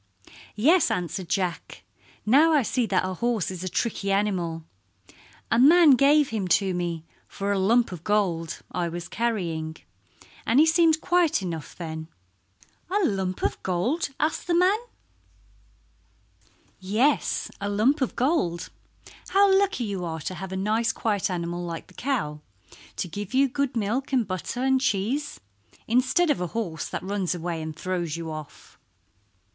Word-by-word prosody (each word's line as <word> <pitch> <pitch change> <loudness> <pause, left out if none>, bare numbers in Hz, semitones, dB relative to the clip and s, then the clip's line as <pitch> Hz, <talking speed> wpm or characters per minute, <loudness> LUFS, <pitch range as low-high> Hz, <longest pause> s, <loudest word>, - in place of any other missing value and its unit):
"Yes," 310 - +4
answered 175 0 -3
Jack. 185 -3 -2 0.4
"Now 295 +9 +5
I 295 -4 +4
see 235 +1 0
that 185 -2 +1
a 185 - -3
horse 225 -1 -1
is 185 -1 -6
a 185 - -2
tricky 200 -1 -1
animal. 180 -5 0 0.9
A 230 - +3
man 315 +4 +7
gave 280 +2 +5
him 210 -4 -2
to 190 +1 +2
me 170 -2 -3 0.2
for 200 0 -3
a 200 - +1
lump 230 +5 +3
of 175 -3 -8
gold 180 -6 0
I 175 -2 -1
was 175 +1 -6
carrying, 170 -9 -2 0.7
and 235 +5 +3
he 310 - +7
seemed 320 -1 +3
quiet 345 - +2
enough 165 -4 -5
then." 160 -2 -6 0.8
"A 400 0 +2
lump 190 - -2
of - - -1
gold?" 220 - -1
asked 310 +3 -1
the 345 - +2
man. 370 +5 +4 2.0
"Yes, 215 +10 +1
a 200 - -2
lump 230 +9 +2
of 260 - -1
gold. 245 - 0 0.6
How 395 0 +4
lucky 390 -9 +1
you 200 -4 -3
are 160 -2 -4
to 185 - -4
have 185 +1 -7
a 190 - -3
nice 220 +4 +1
quiet 210 -4 -1
animal 175 -1 -3
like 170 -1 -5
the - - -20
cow 215 - -2 0.5
to - - -3
give 205 +6 -6
you 275 +1 +5
good 270 -1 -2
milk 230 +7 -1
and 250 -6 +1
butter 190 +7 -3
and 265 0 +3
cheese, 260 +6 -1 0.5
instead 255 +8 +3
of 275 - -1
a 180 - -1
horse 170 -9 -3
that - - -5
runs 190 -2 -1
away 170 -1 -4
and 155 -1 -6
throws 175 -2 -3
you 165 -1 -5
off." 155 -1 -10
205 Hz, 160 wpm, -25 LUFS, 175-265 Hz, 2.0 s, man